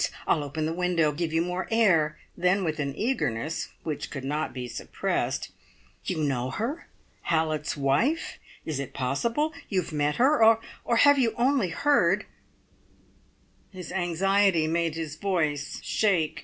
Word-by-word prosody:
I'll 150 - +2
open 150 +2 -3
the 160 - -1
window 175 -3 +1
give 160 +2 -3
you 165 +1 +2
more 180 +1 -3
air." 175 -10 +3 0.2
Then 180 +2 +2
with 155 -2 -2
an 140 -2 -2
eagerness 165 - -1 0.2
which 155 -3 -4
could 135 -3 -6
not 150 +3 -2
be 125 -1 -5
suppressed, - - -2 0.5
"You 155 - -1
know 130 -3 0
her? 240 - -4 0.4
Hallett's 155 -2 0
wife? 145 - 0 0.3
Is 155 -4 -3
it 140 - -6
possible? 230 - 0 0.2
You 185 -3 +1
have 160 - -10
met 150 0 +1
her; 260 0 +4 0.4
or 235 - +1
have 285 +4 +6
you 235 -4 +2
only 250 -5 +2
heard 285 - +2 0.8
" - - -36
His 180 -3 -9
anxiety 190 0 +2
made 165 0 0
his 160 -2 -5
voice 155 -6 -1
shake. 175 -8 +1
165 Hz, 150 wpm, -27 LUFS, 150-200 Hz, 0.8 s, have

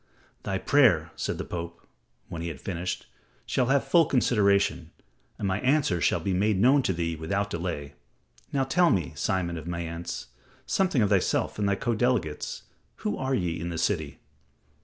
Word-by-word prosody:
"Thy 95 - -2
prayer" 95 - +4
said - - -3
the - - -4
Pope, 85 -1 -6 0.4
when 85 - -6
he 85 - -3
had 80 -5 -6
finished, 90 -1 -4 0.4
"shall 125 - +1
have 135 +1 +2
full 170 -2 +5
consideration, 100 -6 +2 0.5
and 100 - -2
my 95 +1 0
answer 130 - +2
shall 90 - +2
be 95 +4 -1
made 100 +1 +2
known 130 +6 +5
to 110 - 0
thee 85 -2 -2
without 100 +6 -2
delay. 85 -6 -4 0.6
Now 135 -1 +1
tell 175 +6 +3
me, 85 - 0
Simon 85 +2 -1
of 80 0 -8
Mayence, 85 0 -5 0.4
something 180 - +2
of 100 - +1
thyself 100 +1 +1
and 100 -1 +1
thy 100 - +2
co 120 +4 -1
delegates. 110 -10 -1 0.4
Who 105 - +1
are 130 0 -1
ye 85 -6 -1
in 85 +1 -4
the 85 - -4
city?" 80 -5 -1
95 Hz, 175 wpm, -27 LUFS, 85-120 Hz, 0.6 s, full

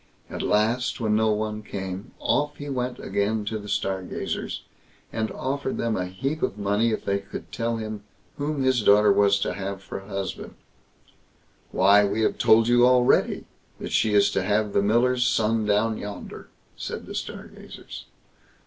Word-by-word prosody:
At - - -4
last, 115 +6 +1
when 110 -2 +1
no 110 0 +3
one 105 0 -2
came, 95 0 -6
off 145 0 0
he 145 0 -7
went 125 -2 -2
again 100 +2 -1
to 110 +1 -3
the 105 0 -9
Stargazers, 95 -2 -3 0.5
and 110 -1 -1
offered 135 +1 -3
them 115 -2 0
a 90 -1 -2
heap 135 +12 -3
of 100 - -1
money 105 +3 +1
if 110 - -3
they 100 0 +1
could 100 - -9
tell 115 0 -1
him 110 -2 -5 0.4
whom 145 -1 -1
his 130 -2 +3
daughter 105 +1 +6
was 100 -1 +4
to - - -1
have 95 0 -5
for - - -6
a 95 - -14
husband. 100 -2 -5 1.1
"Why! 100 +6 +5
we 100 +2 0
have - - +1
told 110 +1 +5
you 120 0 +5
already, 125 0 +3 0.3
that - - -6
she 105 -1 +2
is 100 0 +5
to 95 - 0
have 105 +2 0
the - - +3
miller's 120 +4 +3
son 110 -2 +1
down 105 +2 +1
yonder", 105 0 -8 0.3
said - - -6
the - - -8
Stargazers. - - -8
110 Hz, 170 wpm, -25 LUFS, 100-120 Hz, 1.1 s, daughter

